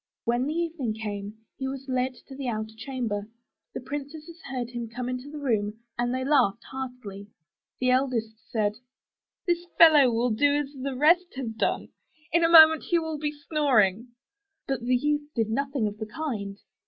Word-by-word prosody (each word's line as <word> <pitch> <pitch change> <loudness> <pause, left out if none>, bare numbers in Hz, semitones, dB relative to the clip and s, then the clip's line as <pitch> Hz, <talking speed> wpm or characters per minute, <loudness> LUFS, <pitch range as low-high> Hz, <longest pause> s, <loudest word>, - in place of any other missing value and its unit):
When 240 +2 +1
the 305 - -2
evening 325 -10 -2
came 205 -1 -5 0.2
he 265 - -3
was 270 0 -6
led 255 0 -1
to 270 - -10
the 270 -1 -5
outer 220 -2 -3
chamber. 220 -4 -4 0.5
The - - -4
princesses 300 +5 -7
heard 245 -2 -4
him 240 -2 -5
come 245 +1 -5
into 255 +2 -4
the 300 - -8
room 220 -7 -1 0.2
and 240 0 -1
they 260 +1 -2
laughed 235 -7 +3
heartily. 250 -7 -7 0.5
The 255 0 +2
eldest 255 -4 +1 0.2
said, 210 -2 0 0.7
*This 345 0 0
fellow 300 -6 +8
will 235 +1 +1
do 285 +6 +3
as 290 -1 -2
the 270 -1 -4
rest 345 +5 +3
have 240 -4 -4
done. - - -1 0.4
In 340 +1 +3
a 330 - +4
moment 320 -1 +8
he 345 - +4
will 320 -2 -3
be 295 0 -1 0.2
snoring 240 - +2 0.3
!'' 400 -1 -56
But 270 -2 -1
the 250 +2 +1
youth 295 +3 0
did 225 -2 0
nothing 275 -2 0
of 205 0 -7
the 220 - -4
kind. 215 -9 -4
255 Hz, 180 wpm, -27 LUFS, 225-295 Hz, 0.7 s, fellow